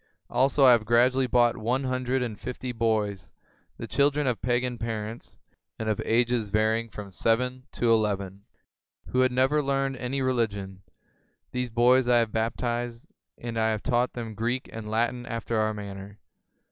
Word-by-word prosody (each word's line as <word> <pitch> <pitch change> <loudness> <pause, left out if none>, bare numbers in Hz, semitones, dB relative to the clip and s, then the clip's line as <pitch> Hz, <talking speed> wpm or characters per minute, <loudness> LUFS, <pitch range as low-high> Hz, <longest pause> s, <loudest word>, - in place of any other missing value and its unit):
Also, 135 +2 +3
I 130 - +9
have 120 -3 +4
gradually 125 +4 +3
bought 120 -1 +3
one 125 +4 -1
hundred 130 0 -1
and 110 -4 -5
fifty 125 0 -5
boys, 110 -5 -1 0.5
the - - -6
children 145 +1 +1
of 125 -3 -1
pagan 125 -1 0
parents, 115 0 -5 0.4
and 110 - -4
of 110 -2 0
ages 120 -1 +1
varying 110 +2 +1
from 105 -2 -9
seven 125 +7 0
to 120 -1 +1
eleven, 100 -3 0 0.7
who 125 - 0
had 130 0 +4
never 130 +4 +2
learned 135 -1 -1
any 130 +2 -2
reli 125 -3 +2
gion. 95 -2 -8 0.7
These 125 -1 -2
boys 120 +2 +4
I 120 - +5
have 115 -2 +1
baptized, 120 +1 -2 0.3
and 115 -1 -4
I 110 0 +2
have 110 -1 -2
taught 125 -1 +1
them 115 -2 -6
Greek 120 +4 -2
and 110 -1 -6
Latin 120 +2 -1
after 115 -1 -2
our 110 0 +1
manner. 100 -1 -8
120 Hz, 165 wpm, -27 LUFS, 110-125 Hz, 0.7 s, I